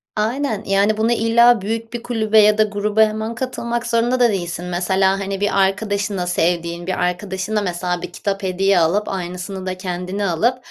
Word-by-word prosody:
Aynen, 220 0 -1
yani, 200 +2 +2
bunu 225 +2 +1
illa 235 0 +4
büyük 225 +3 -4
bir 240 - -5
kulübe 220 -2 +2
ya 210 0 +5
da 215 - +5
gruba 210 +1 0
hemen 220 +1 +1
katılmak 240 -2 -3
zorunda 235 +2 +1
da 240 -1 +5
değilsin. 175 -3 -3
Mesela, 190 +2 +1
hani, 195 0 -4
bir 205 -1 +1
arkadaşına, 200 -1 -1
sevdiğin 170 0 -1
bir 185 - -2
arkadaşına 190 +3 -2
mesela 180 -1 -2
bir - - -7
kitap 200 -1 -3
hediye 190 0 +2
alıp, 180 +6 +1
aynısını 185 +1 -5
da 185 0 -3
kendine 185 +2 -4
alıp 230 +9 +1
200 Hz, 175 wpm, -20 LUFS, 185-220 Hz, -, ya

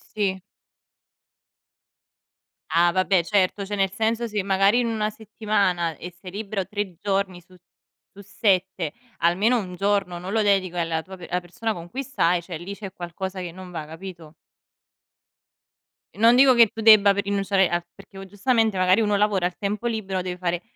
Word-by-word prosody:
Sì. 190 -3 -1 2.3
Ah 170 +1 +4
vabbè 185 0 +2
certo, 200 +1 +1
cioè 205 - -4
nel 195 -1 +1
senso 225 +3 -1
se 210 -3 -2
magari 195 +3 +3
in 245 - +1
una 220 -2 -1
settimana 200 -6 -1
e 180 - -8
sei 180 +2 -12
libero 200 -1 -4
3 205 -2 -4
giorni 195 -3 -1
su 185 +2 -21 0.6
su 200 - -13
7, 185 -4 0 0.2
almeno 200 +9 +2
1 180 -3 -6
giorno 195 -2 0
non 185 +3 -6
lo 225 - +2
dedico 190 -3 +1
alla 165 -1 -1
tua 190 +3 -11
pe 175 - -10
alla 180 +1 -1
persona 215 +6 -4
con 170 -1 -9
cui 270 +8 -4
stai, 180 -10 +1
cioè 170 -2 -6
lì 190 +4 -7
c'è 200 -2 -8
qualcosa 185 +2 -6
che 180 -2 -5
non 185 0 -11
va 160 -3 -5
capito? 165 -1 -10 1.8
Non 230 +3 +5
dico 260 0 +6
che 235 -1 +7
tu 225 - -6
debba 210 -2 +7
p - - -9
rinunciare 195 -1 +1
a 175 0 -1
perché 195 0 -16
o 195 - -8
giustamente 220 +1 +1
magari 185 +4 +4
uno 210 -1 +1
lavora, 200 -3 +1
a 180 - 0
tempo 205 +3 -3
libero 195 -5 -2
deve 180 -1 -5
fare 175 -1 -2
195 Hz, 175 wpm, -24 LUFS, 180-210 Hz, 2.3 s, che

